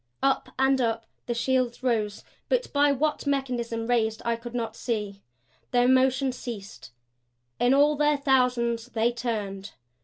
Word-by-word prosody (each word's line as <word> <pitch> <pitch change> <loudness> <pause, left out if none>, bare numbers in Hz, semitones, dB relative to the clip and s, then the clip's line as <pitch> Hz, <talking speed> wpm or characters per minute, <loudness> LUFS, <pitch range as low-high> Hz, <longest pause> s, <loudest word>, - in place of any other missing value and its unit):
Up 270 -1 +1
and 265 0 +3
up 225 -1 -1 0.2
the 240 - -1
shields 255 0 0
rose, 215 -5 0 0.3
but - - 0
by 290 0 +4
what 300 +2 -1
mechanism 245 -5 -1
raised 225 -2 +1
I 235 0 +1
could 235 +1 -9
not 225 -2 -3
see. 210 -5 -3 0.5
Their 245 0 +3
motion 260 +1 +3
ceased; 225 -5 -8 0.7
in 245 +2 +4
all 295 +2 +4
their 295 0 +2
thousands 250 -4 +1
they 235 -1 +1
turned. 210 -5 -4
245 Hz, 145 wpm, -26 LUFS, 230-265 Hz, 0.7 s, by